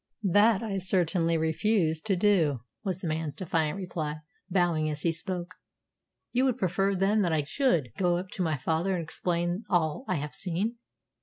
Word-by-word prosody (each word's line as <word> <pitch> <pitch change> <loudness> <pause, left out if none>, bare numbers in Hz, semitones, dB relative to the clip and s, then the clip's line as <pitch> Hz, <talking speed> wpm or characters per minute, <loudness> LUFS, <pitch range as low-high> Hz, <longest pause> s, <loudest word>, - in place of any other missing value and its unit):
"That 205 +3 +4
I 200 -3 -2
certainly 175 -2 +1
refuse 160 0 +1
to 195 0 0
do," 175 - +2 0.2
was 190 -3 -2
the 175 - -3
man's 155 -1 -2
defiant 165 -2 -1
reply, 155 -5 -4 0.3
bowing 175 -4 +2
as 150 -1 -4
he 170 - +3
spoke. 175 +1 -4 0.8
"You 255 +2 +2
would 255 -3 +1
prefer, 195 0 +1
then, 200 +3 +2
that 175 -4 +1
I 155 -2 +1
should 160 - +1
go 175 -2 +3
up 185 +1 -5
to 200 - -5
my 160 -4 +1
father 165 +7 0
and 170 - -2
explain 175 +4 -1
all 175 - +1
I 185 - 0
have 150 -1 -4
seen?" 195 +6 -1
175 Hz, 175 wpm, -28 LUFS, 160-195 Hz, 0.8 s, That